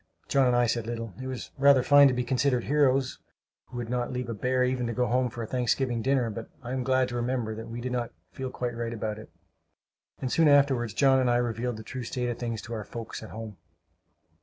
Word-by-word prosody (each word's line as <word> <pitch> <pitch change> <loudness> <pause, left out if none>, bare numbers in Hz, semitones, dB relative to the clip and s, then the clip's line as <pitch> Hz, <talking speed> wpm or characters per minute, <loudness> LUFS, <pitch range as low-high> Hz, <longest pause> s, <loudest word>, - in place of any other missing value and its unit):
John 135 -2 +3
and 125 - +3
I 120 0 +4
said 115 -1 -1
little. 115 -3 -4
It 130 - -5
was 130 -2 -6
rather 140 -2 +6
fine 145 +1 +7
to 130 - +2
be 125 - 0
considered 125 0 +1
heroes, 135 -2 +2 0.5
who 125 - -10
would 120 -1 -3
not 125 +1 -2
leave 125 -1 -4
a - - -2
bear 125 +4 +1
even 125 -1 0
to 120 - -2
go 125 +2 +1
home 125 +1 +1
to 120 - -7
a - - -3
Thanksgiving 125 0 0
dinner; 130 -2 +1
but 110 +1 -7
I 120 - -6
am 130 - -1
glad 130 0 +2
to 120 - -5
remember 120 -2 -1
that 110 +1 -8
we 120 +1 -6
did 125 +1 -3
not 120 -2 -2 0.2
feel 130 -1 -5
quite 125 -2 -4
right 115 0 -3
about 110 -1 -3
it; - - -12 0.9
and 130 -2 -3
soon 165 -1 +4
afterward 140 -4 +4
John 135 0 +4
and 130 -1 +2
I 120 - +3
revealed 120 0 -1
the 110 - -8
true 130 +3 -6
state 125 +1 -3
of 120 - -4
things 115 -3 -3
to 115 - -7
our 110 -2 -4
folks 115 +1 -7
at 110 - -9
home. 110 -3 -8
125 Hz, 245 wpm, -28 LUFS, 115-130 Hz, 0.9 s, fine